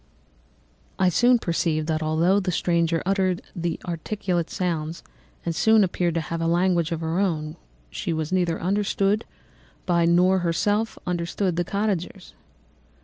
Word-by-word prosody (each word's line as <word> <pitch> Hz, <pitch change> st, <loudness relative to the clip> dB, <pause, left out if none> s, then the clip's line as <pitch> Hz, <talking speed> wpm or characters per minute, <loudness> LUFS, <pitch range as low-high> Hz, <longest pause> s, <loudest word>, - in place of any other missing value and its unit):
"I 185 Hz, -1 st, +3 dB
soon 245 Hz, +7 st, +4 dB
perceived 165 Hz, -5 st, -1 dB
that 155 Hz, 0 st, -1 dB
although 165 Hz, +5 st, +2 dB
the 185 Hz, -2 st, -1 dB
stranger 170 Hz, -1 st, +1 dB
uttered 190 Hz, -2 st, 0 dB, 0.4 s
articulate 175 Hz, 0 st, -2 dB
sounds 165 Hz, -3 st, -3 dB, 0.4 s
and 215 Hz, +6 st, +4 dB
appeared 175 Hz, -2 st, 0 dB
to 165 Hz, -, +1 dB
have 165 Hz, +1 st, -4 dB
a 165 Hz, -, 0 dB
language 175 Hz, -1 st, +2 dB
of 165 Hz, -1 st, -2 dB
her 165 Hz, +2 st, -1 dB
own, 155 Hz, -6 st, -1 dB, 0.4 s
she -, -, -3 dB
was 160 Hz, 0 st, -2 dB
neither 175 Hz, -3 st, +1 dB
understood 200 Hz, +2 st, 0 dB, 0.6 s
by 170 Hz, -2 st, +2 dB
nor 180 Hz, +3 st, +4 dB
herself 205 Hz, +6 st, 0 dB
understood 175 Hz, +1 st, -1 dB
the 175 Hz, -, +1 dB
cottagers. 195 Hz, -1 st, -3 dB
175 Hz, 135 wpm, -24 LUFS, 165-190 Hz, 0.6 s, soon